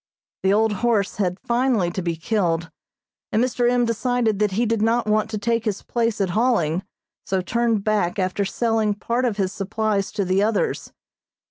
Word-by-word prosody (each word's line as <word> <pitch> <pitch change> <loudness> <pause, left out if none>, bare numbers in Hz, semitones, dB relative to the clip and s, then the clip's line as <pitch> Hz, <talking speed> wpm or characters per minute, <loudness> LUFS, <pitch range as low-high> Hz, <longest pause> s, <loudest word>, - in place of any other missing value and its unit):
The 190 - +2
old 220 +1 +3
horse 225 -5 +1
had 185 -2 -1
finally 235 -7 +1
to 185 - -3
be 170 -1 -2
killed, 170 -3 -1 0.6
and - - +2
Mr. 245 -1 +1
M. 245 0 +2
decided 230 -2 0
that 210 -2 +1
he 230 +5 +1
did 225 -1 0
not 230 +2 +2
want 215 0 +1
to 220 - -3
take 230 +2 0
his 205 -3 -2
place 230 -2 -1
at 190 -3 0
hauling, 185 -7 +1 0.4
so 190 - -1
turned 225 +2 0
back 210 -4 0
after 185 +1 0
selling 220 0 0
part 235 +4 -1
of 225 -4 -1
his 190 -2 -1
supplies 205 0 -1
to 205 -2 -1
the 185 +2 +2
others. 215 0 0
215 Hz, 180 wpm, -22 LUFS, 195-230 Hz, 0.6 s, old